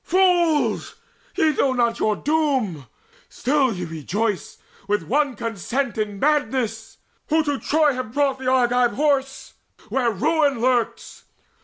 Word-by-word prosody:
Fools! 350 Hz, -4 st, +2 dB, 0.4 s
ye 310 Hz, -1 st, +2 dB
know 265 Hz, -1 st, +1 dB
not 235 Hz, -2 st, 0 dB
your 215 Hz, -1 st, +1 dB
doom: 265 Hz, -, -1 dB, 0.4 s
still 270 Hz, -1 st, +1 dB
ye 180 Hz, -4 st, -4 dB
rejoice 175 Hz, +4 st, -3 dB, 0.3 s
With 205 Hz, 0 st, 0 dB
one 285 Hz, 0 st, 0 dB
consent 230 Hz, +4 st, -3 dB
in 210 Hz, -2 st, -3 dB
madness, 255 Hz, -6 st, -1 dB, 0.3 s
who 320 Hz, +1 st, +3 dB
to 290 Hz, -2 st, -2 dB
Troy 300 Hz, -1 st, +2 dB
Have 255 Hz, -3 st, -5 dB
brought 275 Hz, 0 st, 0 dB
the 260 Hz, -, -5 dB
Argive 245 Hz, -1 st, +2 dB
Horse 275 Hz, -2 st, -1 dB, 0.4 s
where 255 Hz, -3 st, +1 dB
ruin 285 Hz, -, +1 dB
lurks! 245 Hz, -1 st, -1 dB
260 Hz, 130 wpm, -22 LUFS, 225-290 Hz, 0.4 s, who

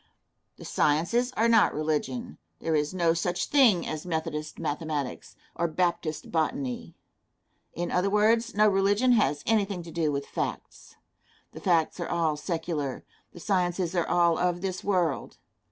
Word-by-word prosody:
The -, -, -11 dB
sciences 175 Hz, +12 st, +1 dB
are 225 Hz, +2 st, +3 dB
not 225 Hz, -2 st, +4 dB
religion. 145 Hz, -, -2 dB, 0.2 s
There 165 Hz, -, -1 dB
is 150 Hz, 0 st, 0 dB
no 170 Hz, -3 st, +2 dB
such 175 Hz, +1 st, -1 dB
thing 235 Hz, -, +4 dB
as 155 Hz, -1 st, -4 dB
Methodist 160 Hz, -3 st, -4 dB
mathematics, 150 Hz, -3 st, -4 dB, 0.2 s
or 170 Hz, -, 0 dB
Baptist 170 Hz, -2 st, -2 dB
botany. 140 Hz, -6 st, -2 dB, 0.8 s
In 175 Hz, +1 st, -3 dB
other 180 Hz, +2 st, +1 dB
words, 225 Hz, +3 st, +2 dB
no 215 Hz, +1 st, +5 dB
religion 205 Hz, +5 st, +3 dB
has 150 Hz, -, +2 dB
anything 200 Hz, -5 st, 0 dB
to 165 Hz, -, -10 dB
do 160 Hz, -2 st, 0 dB
with 140 Hz, 0 st, -3 dB
facts. -, -, -5 dB, 0.6 s
The -, -, -10 dB
facts 170 Hz, -2 st, +1 dB
are 175 Hz, -, -3 dB
all 165 Hz, -3 st, +1 dB
secular; 155 Hz, -3 st, -3 dB, 0.3 s
the -, -, -12 dB
sciences 180 Hz, -1 st, 0 dB
are 170 Hz, -, 0 dB
all 170 Hz, -1 st, +3 dB
of 175 Hz, -1 st, 0 dB
this 185 Hz, -1 st, -3 dB
world. 180 Hz, -8 st, -1 dB
170 Hz, 150 wpm, -27 LUFS, 155-195 Hz, 0.8 s, no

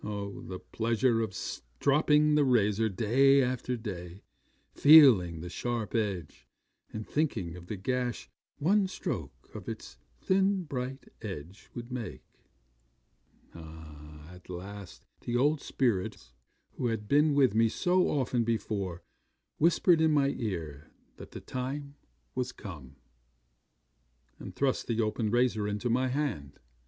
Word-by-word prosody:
Oh! 100 Hz, -1 st, -5 dB
the 95 Hz, -, -7 dB
pleasure 115 Hz, +3 st, 0 dB
of 110 Hz, -3 st, -2 dB
stropping 150 Hz, -, +1 dB
the 150 Hz, -1 st, +4 dB
razor 110 Hz, -4 st, +2 dB
day 130 Hz, +7 st, +4 dB
after 125 Hz, 0 st, -2 dB
day, 95 Hz, -4 st, -7 dB, 0.5 s
feeling 120 Hz, -, +7 dB
the 90 Hz, -, -6 dB
sharp 115 Hz, +4 st, -3 dB
edge, 100 Hz, -9 st, -3 dB, 0.4 s
and 110 Hz, 0 st, -6 dB
thinking 110 Hz, -, -1 dB
of 90 Hz, -1 st, -11 dB
the 105 Hz, -, -4 dB
gash 125 Hz, +4 st, -2 dB, 0.3 s
one 195 Hz, +6 st, +2 dB
stroke 185 Hz, -, -6 dB
of -, -, -7 dB
its -, -, -8 dB, 0.2 s
thin, 195 Hz, 0 st, +2 dB
bright 130 Hz, -3 st, -5 dB
edge 95 Hz, -1 st, -8 dB
would 120 Hz, 0 st, -7 dB
make! 125 Hz, -4 st, -6 dB, 1.3 s
'At 80 Hz, +1 st, -12 dB
last 95 Hz, +2 st, -9 dB
the 120 Hz, 0 st, -2 dB
old 145 Hz, +3 st, +2 dB
spirits 115 Hz, -9 st, -2 dB, 0.4 s
who 125 Hz, -, -1 dB
had 110 Hz, -2 st, -3 dB
been 150 Hz, +2 st, +3 dB
with 135 Hz, -6 st, +4 dB
me 115 Hz, +1 st, +3 dB
so 180 Hz, -, +2 dB
often 125 Hz, -4 st, 0 dB
before 100 Hz, -6 st, -2 dB, 0.6 s
whispered 170 Hz, +1 st, +4 dB
in 160 Hz, -1 st, +4 dB
my 140 Hz, -2 st, +3 dB
ear 80 Hz, -, -5 dB, 0.3 s
that -, -, -10 dB
the -, -, -9 dB
time 140 Hz, +3 st, -5 dB, 0.4 s
was 125 Hz, 0 st, -2 dB
come, 75 Hz, -, -10 dB, 1.4 s
and -, -, -9 dB
thrust 135 Hz, -2 st, 0 dB
the 115 Hz, -1 st, -1 dB
open 110 Hz, 0 st, 0 dB
razor 120 Hz, -2 st, +1 dB
into 105 Hz, +4 st, -2 dB
my 130 Hz, +2 st, +2 dB
hand. 130 Hz, -, -3 dB
115 Hz, 130 wpm, -30 LUFS, 95-135 Hz, 1.4 s, feeling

